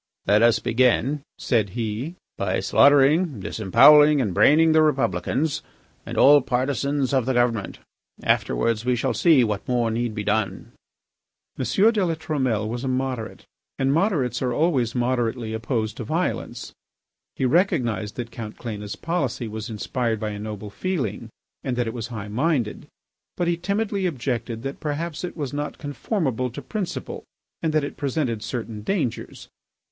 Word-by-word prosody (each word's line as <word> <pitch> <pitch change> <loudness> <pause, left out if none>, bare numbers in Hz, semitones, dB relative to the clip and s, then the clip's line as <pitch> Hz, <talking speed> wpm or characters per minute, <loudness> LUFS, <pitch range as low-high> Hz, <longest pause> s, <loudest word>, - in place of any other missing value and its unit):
"Let 105 +1 +4
us 115 -1 +5
begin," 125 +5 +1 0.2
said 110 -6 +1
he, 115 +9 -3 0.2
"by 95 -1 -1
slaughtering, 140 - +4
disembowelling, 145 +10 +6
and 105 -8 0
braining 160 - +5
the 155 0 +5
Republicans 135 - 0 0.5
and - - -5
all 145 +1 +7
partisans 135 +2 -1
of 130 -3 +1
the 130 - +1
government. 120 -4 0 0.5
Afterwards 115 -1 +1
we 125 0 +1
shall 125 +1 -1
see 130 +4 +5
what 105 0 -2
more 120 -3 +1
need 115 -1 -2
be 105 - -3
done." 105 -3 -1 0.9
M. - - -1 0.3
de 210 -4 0
La 165 -2 0
Trumelle 130 -9 -1
was 120 +3 -4
a - - -2
moderate, 130 -3 -3 0.3
and 135 0 +1
moderates 155 - +1
are 125 -2 0
always 130 -5 +1
moderately 120 -2 -1
opposed 110 -1 -2
to - - -4
violence. 165 +10 -3 0.6
He 130 - -1
recognised 125 - +1
that 120 -2 -5
Count 110 -2 -7
Cléna's 105 -4 -6
policy 140 -9 -2
was 110 +1 -6
inspired 115 +1 -2
by 110 0 -2
a 105 - -6
noble 105 -1 -6
feeling 120 - -3 0.3
and 130 -2 -2
that 120 0 0
it 115 - -4
was 115 -2 -5
high 110 -4 -6
minded, 125 0 -1 0.5
but 175 - 0
he 170 - +2
timidly 200 +2 -1
objected 120 -5 -3
that 135 0 -5
perhaps 155 +2 -3
it 180 - -5
was 145 -3 -4
not 145 +1 -4
conformable 140 - -2
to 120 - -8
principle, 200 -6 -5 0.4
and 160 - 0
that 155 -1 +1
it 145 - -5
presented 135 -6 -1
certain 115 -1 -5
dangers. 140 - -3
125 Hz, 155 wpm, -24 LUFS, 110-150 Hz, 0.9 s, all